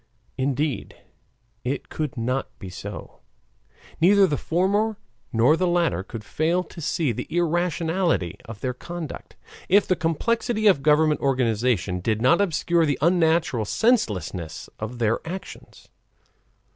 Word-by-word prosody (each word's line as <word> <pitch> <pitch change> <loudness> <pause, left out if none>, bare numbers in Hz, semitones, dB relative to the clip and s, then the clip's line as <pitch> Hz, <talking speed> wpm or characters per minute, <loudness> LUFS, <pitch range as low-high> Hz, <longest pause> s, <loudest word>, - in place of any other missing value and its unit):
Indeed, 135 -1 -2 0.7
it 135 +3 -3
could 150 -5 -4
not 125 +3 -1
be 95 - -8
so, 90 - -8 0.8
neither 195 +3 +6
the 150 - 0
former 200 +8 0 0.3
nor 120 +7 +4
the 185 +2 0
latter 170 - +1
could 105 +3 -8
fail 165 +10 0
to 170 - -11
see 150 -2 0
the 110 - -5
irrationality 170 - 0
of 115 -3 -9
their 130 -1 -1
conduct, 170 +3 -8 0.3
if 200 +2 +5
the 185 - +2
complexity 220 - 0
of 190 -9 +5
government 150 +1 +3
organization 115 -8 +1
did 110 +3 0
not 165 - +4
obscure 170 -2 +2
the 145 - 0
unnatural 165 -6 +2
senselessness 95 - 0
of 110 +3 -5
their 115 -1 +1
actions. 185 +3 -9
155 Hz, 130 wpm, -24 LUFS, 120-175 Hz, 0.8 s, neither